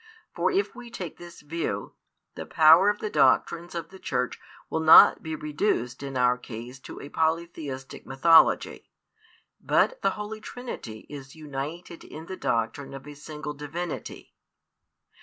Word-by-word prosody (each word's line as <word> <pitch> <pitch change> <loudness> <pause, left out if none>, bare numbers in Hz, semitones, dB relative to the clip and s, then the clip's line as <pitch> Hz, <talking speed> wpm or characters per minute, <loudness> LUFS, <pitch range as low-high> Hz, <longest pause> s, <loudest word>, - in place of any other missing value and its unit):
For - - +1
if 395 +1 0
we 245 -2 -10
take 180 -8 -7
this 175 0 -12
view, 165 +2 -4 0.4
the - - -8
power 160 +6 +6
of 205 - 0
the 215 - -4
doctrines 165 +5 +2
of 165 -1 -5
the 190 - -13
Church 125 -5 -2 0.3
will 160 - -2
not 160 0 +8
be 160 0 -4
reduced 150 - -2
in 135 -2 -5
our 125 0 +3
case 125 +2 -9
to - - -10
a - - -8
polytheistic 160 -5 -3
mythology, 160 +5 +4 0.7
but - - +2
the - - +3
Holy 215 +1 -6
Trinity 220 - -8
is 135 -1 -10
united 155 +3 -7
in 160 +1 -10
the 190 - -6
doctrine 115 +1 -2
of 135 -1 -10
a 145 - -8
Single 150 0 -7
Divinity. 150 +4 -6
155 Hz, 150 wpm, -26 LUFS, 135-170 Hz, 0.7 s, not